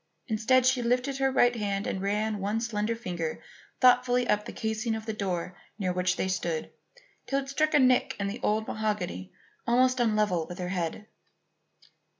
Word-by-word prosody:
Instead, 230 +4 +3
she 255 -1 +3
lifted 250 +3 0
her 270 0 +2
right 245 -2 +4
hand 200 -2 -2
and 190 - -2
ran 210 +2 -1
one 205 +3 -1
slender 225 -1 -1
finger 175 -8 -4 0.4
thoughtfully 250 -1 +4
up 210 0 +1
the - - -6
casing 220 +1 -2
of 220 -1 -6
the 220 - -3
door 180 -3 -3 0.2
near 185 -4 -1
which 180 0 +1
they 190 - -1
stood 175 -4 -2 0.6
till 275 - 0
it 270 - -9
struck 310 +2 +1
a - - +6
nick 255 -1 +3
in 200 - -1
the 200 +5 -4
old 215 +1 0
mahogany 205 - -3 0.4
almost 255 +1 +3
on 235 - +3
a 215 - 0
level 185 -7 +1
with 175 - -8
her 180 -1 -4
head. 180 +2 -3
215 Hz, 185 wpm, -28 LUFS, 190-245 Hz, 0.6 s, a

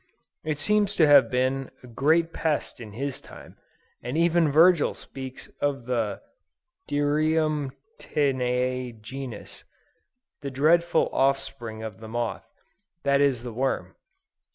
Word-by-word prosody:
It 155 -2 -2
seems 210 +6 +2
to 160 - +5
have 145 -2 +7
been 130 +1 0
a - - -11
great 160 +7 +2
pest 150 -5 -2
in 105 -3 -9
his 135 +4 -4
time; - - -13 0.4
and 125 +5 -3
even 170 -2 +3
Virgil 165 +1 +5
speaks 130 -1 -9
of 140 -4 -1
the 115 -5 -2 0.7
"dirum 150 0 +1 0.3
tineæ 125 -3 -1
genus," 125 0 -8 0.8
the 140 - -4
dreadful 165 +5 +3
offspring 135 -5 -1
of 110 -3 -7
the 110 - -9
moth; 120 +1 -3 0.5
that 140 0 +3
is 135 -4 +2
the 120 -2 -6
worm. 130 +3 -1
135 Hz, 125 wpm, -26 LUFS, 125-155 Hz, 0.8 s, have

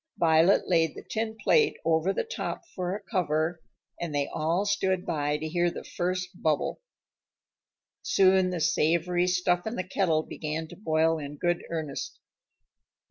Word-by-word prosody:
Violet 165 +3 +4
laid 165 -3 +2
the - - -9
tin 220 0 -3
plate 450 - +3
over 165 +3 +2
the - - -1
top 465 -4 -5
for 180 0 -2
a 210 - -7
cover, 165 -4 -1 0.4
and 170 -4 -4
they 145 -1 +1
all 165 +6 0
stood 190 -3 0
by 150 -2 0
to 155 +1 -4
hear 175 +2 +1
the - - -7
first 180 +1 -3
bubble. 155 - 0 1.2
Soon 190 -1 +4
the 180 -2 -3
savory 170 +3 +2
stuff 180 +1 +1
in 220 - -3
the 185 - -2
kettle 165 -5 +1
began 155 +1 -4
to - - -10
boil 160 -3 +1
in 145 0 -6
good 175 +1 0
earnest. 155 -4 -4
175 Hz, 155 wpm, -28 LUFS, 160-185 Hz, 1.2 s, Violet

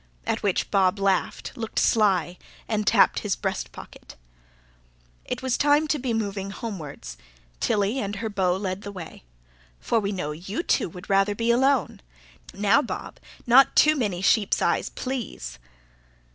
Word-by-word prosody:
at - - -1
which 200 -3 -1
Bob 190 -1 +3
laughed, 195 -2 -1
looked 225 -2 -6
sly, 190 -6 +2 0.3
and 215 -2 -1
tapped - - +4
his - - -1
breast - - -3
pocket. - - -12 1.1
It - - -5
was 260 -2 0
time 295 +2 +3
to 300 - +1
be 255 -1 -2
moving 200 -3 -2
homewards. 195 -9 -7 0.4
Tilly 205 +5 +1
and 205 -3 -3
her 220 +3 -3
beau 190 -3 0
led 190 -1 -3
the 205 - -7
way. 180 -5 -9 0.6
"For 230 - +1
we 200 -1 -2
know 180 -6 -3
you 185 - -5
two - - +1
would 180 +3 -11
rather 195 +1 +2
be 230 +2 +1
alone. 265 -1 +1 0.5
Now, 205 +7 +3
Bob, - - -6 0.3
not 255 +3 +6
too 305 0 +6
many 200 -9 -2
sheep's 205 +1 +3
eyes, - - +1
please!" 225 - -5
205 Hz, 155 wpm, -25 LUFS, 190-235 Hz, 1.1 s, not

